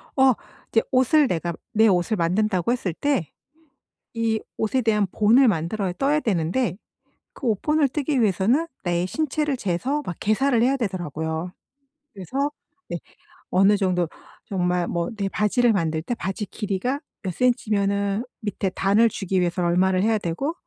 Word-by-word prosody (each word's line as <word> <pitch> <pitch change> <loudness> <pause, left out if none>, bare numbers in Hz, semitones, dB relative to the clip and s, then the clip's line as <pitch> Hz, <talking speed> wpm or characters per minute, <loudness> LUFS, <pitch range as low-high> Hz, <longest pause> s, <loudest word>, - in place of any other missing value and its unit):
어. 265 -1 +5 0.4
이제 225 - +4
옷을 265 +3 +4
내가 170 -3 -2 0.2
내 220 +1 +5
옷을 190 +3 +2
만든다고 185 +3 +1
했을 205 -9 -1
때 265 - -1 0.8
이 225 -1 0 0.2
옷에 225 +4 0
대한 210 -3 +2
본을 230 +6 +5
만들어야 185 0 0
떠야 285 +2 +2
되는데 190 - 0 0.6
그 - - -9
옷 215 -4 +1
본을 300 -2 +2
뜨기 285 0 -1
위해서는 220 - +2 0.2
내 175 -1 0
신체를 300 +4 -1
재서 250 +9 -1
막 175 - -5
계산을 235 +3 +2
해야 270 +3 +3
되더라고요. 170 - -3 0.6
그래서 265 - -2 0.4
네. - - -3 0.5
어느 195 +3 +4
정도 185 -3 +1 0.4
정말 180 -2 0
뭐 170 -1 -2
내 195 -1 -1
바지를 220 +3 +2
만들 160 -4 -1
때 240 - -2
바지 200 -2 -3
길이가 210 +7 -2 0.2
몇 185 - -3
센치면은 200 -2 +1 0.2
밑에 205 -2 -2
단을 200 +5 +3
주기 195 -2 -1
위해서 175 0 0
얼마를 185 +2 +2
해야 220 0 +2
되고 200 - -2
205 Hz, 300 characters per minute, -23 LUFS, 180-245 Hz, 0.8 s, 어